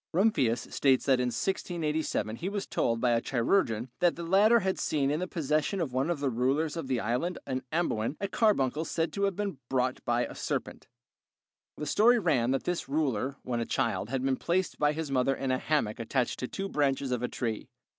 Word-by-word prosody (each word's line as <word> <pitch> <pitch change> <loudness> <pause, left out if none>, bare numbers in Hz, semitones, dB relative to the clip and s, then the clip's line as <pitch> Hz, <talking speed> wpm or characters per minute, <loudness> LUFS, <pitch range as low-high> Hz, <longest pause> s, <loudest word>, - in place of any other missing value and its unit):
Rumphius 140 - +2
states 135 -2 +3
that 130 -2 +4
in 125 - +1
1687 155 - -2
he 175 +9 -3
was 200 -1 -3
told 115 0 0
by 125 0 +2
a 115 0 +2
chirurgeon 120 - +1
that 175 -1 +3
the 170 - -6
latter 205 +7 +5
had 190 0 -1
seen 140 -2 +1
in 150 - 0
the 180 - -2
possession 155 +3 0
of 150 -7 -2
one 130 +5 0
of 170 -4 -1
the 140 -2 0
rulers 135 +7 0
in 165 -5 -4
the 130 -2 0
island 125 +12 -1
of 130 0 -2
Amboin 155 -6 -1
a 200 - -1
carbuncle 160 - +2
said 165 0 -2
to 200 0 +1
have 195 -2 -1
been 200 -8 -3
brought 130 -1 0
by 120 0 +1
a - - -8
serpent. - - -4 0.9
The 150 - -4
story 230 +10 +5
ran 150 - +2
that 135 0 0
this 175 -5 -2
ruler, 135 -3 0
when 120 -2 -2
a - - 0
child, 115 -4 -1
had 130 0 -2
been 135 -1 +1
placed 185 +2 -1
by 150 0 +3
his 155 -2 -4
mother 135 0 +2
in 135 -1 -2
a 130 - +1
hammock 130 -9 0
attached 120 +2 -1
to 125 - -3
two 195 +8 -4
branches 140 -5 0
of 125 -2 -1
a 125 - 0
tree. 115 -4 -4
140 Hz, 215 wpm, -29 LUFS, 125-175 Hz, 0.9 s, latter